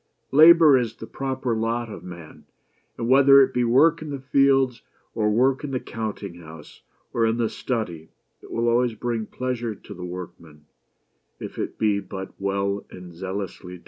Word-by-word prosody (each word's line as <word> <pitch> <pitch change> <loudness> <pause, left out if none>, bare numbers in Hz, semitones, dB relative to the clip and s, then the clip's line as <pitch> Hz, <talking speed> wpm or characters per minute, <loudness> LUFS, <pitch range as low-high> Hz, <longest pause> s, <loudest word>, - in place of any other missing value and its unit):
Labor 155 -1 +7
is 115 -2 -3
the 110 - -9
proper 130 -2 -3
lot 115 +2 -1
of - - -9
man; 85 -3 -11 0.5
and 115 - -3
whether 135 +2 +7
it 130 0 -2
be 125 - +1
work 150 +8 +4
in 155 - -7
the 140 -1 -5
fields, 135 -2 +2 0.3
or 105 -2 0
work 130 +6 +2
in 145 - -4
the 130 -2 -2
counting 105 -7 -6
house, 80 -2 -13 0.3
or 115 - +1
in 110 +1 0
the 115 -2 0
study, 90 -10 -4 0.3
it - - -15
will 115 +1 -1
always 120 0 +2
bring 115 -1 -3
pleasure 120 -3 -4
to 105 - -12
the 90 -2 -9
workman, 85 -4 -9 0.7
if - - -8
it - - -4
be 105 -2 +1
but 95 -1 -8
well 100 0 -1
and 90 -1 -11
zealously 95 0 -6
done. - - -20
115 Hz, 175 wpm, -24 LUFS, 95-130 Hz, 0.7 s, Labor